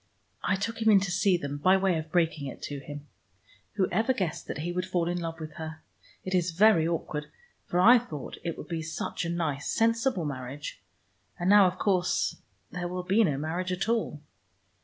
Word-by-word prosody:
I 195 - +2
took 225 +4 -3
him 220 - +4
in 205 -2 +7
to 190 -2 -2
see 195 0 +3
them 145 -2 -5
by 185 +5 +5
way 190 -2 +2
of 155 0 -8
breaking 165 -5 +1
it 130 - -8
to 145 -1 -4
him. 145 +1 -9 0.7
Whoever 220 +5 +1
guessed 185 -9 -3
that - - -4
he 175 - -1
would 180 +1 -2
fall 175 -2 0
in 175 0 -1
love 165 -1 -5
with 155 -1 -6
her? 160 -1 -7 0.4
It 185 - -4
is 180 -1 +2
very 185 -3 +5
awkward, 155 -3 -3 0.4
for 175 - 0
I 240 +7 +8
thought 155 - -8
it 170 -2 -3
would - - -8
be 165 -2 -3
such 160 +2 -4
a - - -2
nice 160 -5 -2
sensible 230 - +1
marriage. 135 -1 -6 0.6
And 175 +2 +2
now 205 -2 +8
of 180 +1 -3
course 185 -3 +1 0.3
there 180 -1 -3
will 180 +1 -4
be 195 +5 +3
no 150 -9 +1
marriage 170 +5 -2
at 185 +3 -1
all." 225 -9 0
175 Hz, 200 wpm, -28 LUFS, 155-195 Hz, 0.7 s, I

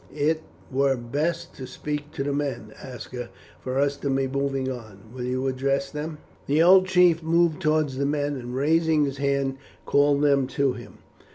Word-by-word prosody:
It 155 +2 +1 0.3
were 135 0 +2
best 145 +8 -2
to 130 - -7
speak 150 +3 -5
to 135 - -2
the 140 0 -1
men, 140 -7 -3
Aska, 125 -1 -7 0.3
for 130 0 -4
us 140 0 +2
to 140 - -3
be 135 0 +1
moving 135 0 -1
on; 110 -4 -10
will 125 -1 -5
you 130 +1 -1
address 135 +1 0
them?" 150 +1 -5 0.3
The 150 +3 +4
old 185 +1 +7
chief 180 -3 +4
moved 165 -1 +2
towards 155 -3 +1
the 140 - +1
men, 145 0 0
and 125 -1 -6
raising 155 +2 +3
his 140 0 -4
hand, 140 -1 0 0.3
called 145 0 +3
them 140 -2 +3
to 140 -2 +3
him. 120 -2 -11
140 Hz, 180 wpm, -25 LUFS, 130-150 Hz, 0.3 s, old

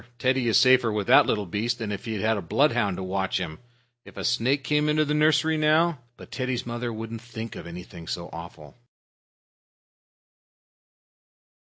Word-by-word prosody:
"Teddy's 125 -2 +2
safer 130 -3 +5
with 105 -2 -2
that - - +6
little 105 -2 0
beast 110 +7 -2
than 110 -3 -4
if 100 +3 -5
he 110 -3 -3
had 110 +1 +2
a 100 - -3
bloodhound 115 - +1
to 95 - -4
watch 95 0 -1
him. 80 -4 -5 0.4
If - - -15
a - - -4
snake 125 +4 +1
came 150 +3 +1
into 155 0 +2
the 150 - -1
nursery 155 +1 +3
now 155 +1 +3
" 125 - -46
But - - -13
Teddy's 130 -2 -3
mother 120 0 -4
wouldn't 115 0 -6
think 115 -2 -8
of - - -8
anything 85 -1 -10
so 85 0 -4
awful. 80 -3 -10
115 Hz, 170 wpm, -25 LUFS, 100-130 Hz, 0.4 s, that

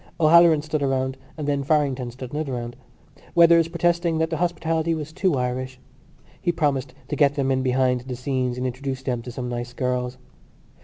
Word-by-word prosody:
O'Halloran 165 -1 +6
stood 155 -1 -2
a 140 - +1
round 130 0 0 0.2
and 150 -2 -4
then 140 -1 +1
Farrington 140 -4 +1
stood 125 +1 -9
another 150 -3 -2
round, 120 -1 -5 0.6
Weathers 170 -1 +6
protesting 170 0 +1
that 160 +1 0
the 160 - -1
hospitality 165 -1 0
was 155 0 -6
too 185 -2 +1
Irish. 130 0 -3 0.6
He 175 - +1
promised 140 -5 -1
to - - -1
get 145 -1 +3
them 135 -2 0
in 130 0 +1
behind 125 -1 +1
the 125 0 -6
scenes 125 -1 -2
and 125 - -2
introduce 130 +1 -4
them 125 -3 -2
to 125 - -8
some 125 +1 -5
nice 120 0 -4
girls. 125 0 -2
135 Hz, 190 wpm, -24 LUFS, 125-160 Hz, 0.6 s, O'Halloran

